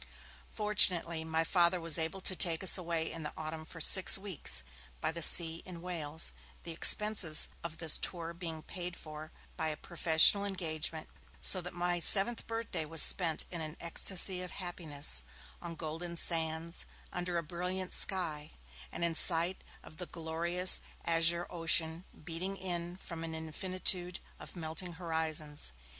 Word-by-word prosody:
Fortunately 180 -6 +2
my 160 0 -1
Father 175 +1 +1
was 165 -1 +6
able 165 +4 -3
to 185 - -1
take 170 -2 +2
us 190 - +4
away 170 -3 -1
in 165 - -7
the 150 - -6
autumn 155 0 -6
for 165 +1 -10
six 185 +5 +7
weeks 190 - -2 0.4
by - - -2
the 170 +1 -7
sea 165 0 +4
in 180 -2 -10
Wales, 165 -3 -4 0.3
the 170 - -6
expenses 180 -1 +1
of 165 -1 -7
this 165 -2 +2
tour 170 -2 -5
being 165 -2 -7
paid 180 -1 -6
for 155 0 -10 0.3
by 160 - -2
a 155 -1 -4
professional 170 +4 +4
engagement, 160 -5 -4 0.3
so 185 - +3
that 180 0 -9
my 175 0 -2
seventh 210 +7 +3
birthday 225 -7 -4
was 160 +1 +6
spent 165 -4 +4
in 170 -2 -5
an 155 0 -7
ecstasy 180 +2 +1
of 180 - -6
happiness, 155 - -3 0.4
on 170 -1 -6
golden 165 +2 -5
sands, 165 0 -1 0.3
under 175 -1 -3
a 170 - -3
brilliant 180 +3 -5
sky, 160 -6 0 0.4
and - - -5
in 170 - -1
sight 170 +2 +2 0.2
of 155 - -15
the 180 - -7
glorious 170 +2 +2 0.2
azure 170 +1 +2
ocean 165 0 +2 0.2
beating 180 +4 -4
in 175 -1 -4
from 165 -3 -8
an 160 -1 -6
infinitude 180 +2 0 0.2
of - - -11
melting 170 +1 -5
horizons. 160 - -1
170 Hz, 155 wpm, -31 LUFS, 160-180 Hz, 0.4 s, six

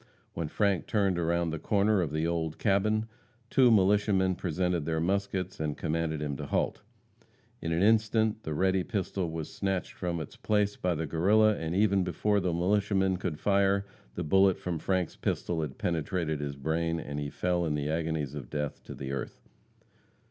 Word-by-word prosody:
When 80 -2 -3
Frank 100 +2 0
turned 100 -4 +1
around 85 0 0
the 80 - -4
corner 100 +2 +2
of 80 - -2
the 80 +1 0
old 80 -2 -1
cabin, 105 +2 +2 0.5
two 130 -3 +6
militiamen 100 -2 +3
presented 90 -1 -1
their 80 +1 -1
muskets 95 +1 -1
and 75 -2 -2
commanded 80 -1 -1
him 70 -2 -2
to - - -6
halt. - - -1 0.8
In 80 - -2
an 85 +3 +2
instant 110 0 +3
the 80 -6 -4
ready 95 +2 +2
pistol 95 -3 -2
was 80 -1 -5
snatched 95 -2 -2
from 85 -2 -3
its 80 - -8
place 105 -1 +1
by 90 -1 -1
the 80 +1 -2
Guerrilla, 105 +8 +4
and 80 -1 -3
even 100 -1 +3
before 100 +3 +1
the 90 -2 0
militiaman 95 +2 +1
could 85 -4 -4
fire, 100 0 +2 0.3
the - - -2
bullet 95 +4 +4
from 85 -3 -3
Frank's 95 0 -1
pistol 85 -2 -2
had 75 -4 -5
penetrated 80 -1 -1
his 70 -1 -4
brain, 80 +4 -1
and 75 -2 -5
he 75 -1 -3
fell 90 +3 0
in 80 -3 0
the 75 0 -2
agonies 80 -3 -1
of 70 -5 -7
death 75 -2 -4
to - - -8
the 65 0 -5
earth. 70 -1 -5
90 Hz, 180 wpm, -29 LUFS, 80-100 Hz, 0.8 s, two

